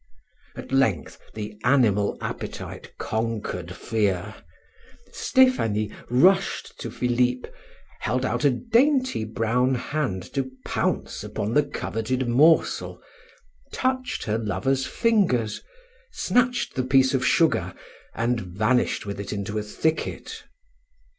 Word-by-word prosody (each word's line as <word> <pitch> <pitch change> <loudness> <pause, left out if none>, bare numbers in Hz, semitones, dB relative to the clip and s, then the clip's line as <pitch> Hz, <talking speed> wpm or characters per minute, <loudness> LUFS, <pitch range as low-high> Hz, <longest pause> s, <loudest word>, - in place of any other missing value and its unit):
At - - -9
length 135 - +1 0.2
the 105 -1 -6
animal 115 -6 +3
appetite - - -6
conquered 110 -6 -3
fear; 100 -3 -1 0.8
Stephanie 110 - +2 0.2
rushed 185 +11 +2
to - - -5
Philip, 125 0 0 0.5
held 125 +5 -1
out - - -1
a 145 - +6
dainty 255 - +2
brown 115 +4 +1
hand 125 -8 -2
to 135 -1 -1 0.2
pounce - - -2
upon 105 +3 -3
the 150 - +5
coveted 130 -3 -3
morsel, 150 +7 +3 0.7
touched 255 -1 -1
her 110 0 -1
lover's 130 +5 0
fingers, 185 - +1 0.5
snatched 250 - +1
the 130 - -1
piece 130 +1 +4
of 130 -1 +1
sugar, 165 +5 +2 0.4
and 115 0 0
vanished 105 +9 0
with 100 -1 -5
it 100 - -5
into 105 +1 -3
a - - -2
thicket. 155 +9 -3
125 Hz, 110 wpm, -25 LUFS, 110-145 Hz, 0.8 s, a